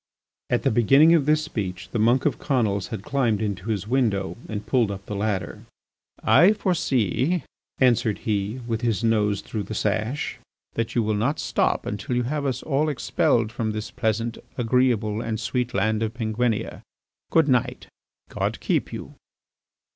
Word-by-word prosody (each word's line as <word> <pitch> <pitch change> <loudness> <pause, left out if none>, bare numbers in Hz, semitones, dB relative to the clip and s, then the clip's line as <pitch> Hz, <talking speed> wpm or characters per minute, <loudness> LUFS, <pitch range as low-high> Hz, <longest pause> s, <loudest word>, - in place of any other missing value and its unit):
At - - +1
the - - +2
beginning 135 +8 +6
of 155 -4 +3
this 155 0 +3
speech 95 - -5
the 115 - -1
monk 120 +4 +3
of 150 - +1
Conils 110 -8 0
had 110 -4 -6
climbed 125 -6 +1
into 105 -1 -3
his 105 -2 -2
window 110 -6 0
and 105 -1 -4
pulled 120 -5 +2
up 100 0 -6
the 105 - -5
ladder. 100 -2 -2 0.6
"I 155 - +6
foresee," 160 - 0 0.3
answered 120 -4 +3
he, 105 +3 -1
with 115 -1 -2
his 115 -2 0
nose 105 -3 +2
through 110 - -4
the 105 +2 -6
sash, 110 +7 -1 0.3
"that 115 -1 -3
you 120 - +3
will 110 0 0
not 120 +9 0
stop - - 0
until 105 +4 -3
you 125 - +1
have 145 +3 -2
us 130 -2 -2
all 150 +1 +1
expelled 120 -5 +1
from 110 -1 -2
this 110 0 -5
pleasant, 115 -1 -1 0.2
agreeable, 115 -3 +1
and 110 -2 -3
sweet 125 +2 -1
land 110 +2 +1
of 110 +1 -2
Penguinia. 115 -1 -1 0.5
Good 160 -2 +4
night; 125 -4 +1 0.4
God - - -2
keep - - 0
you!" - - -7
115 Hz, 165 wpm, -24 LUFS, 105-130 Hz, 0.6 s, beginning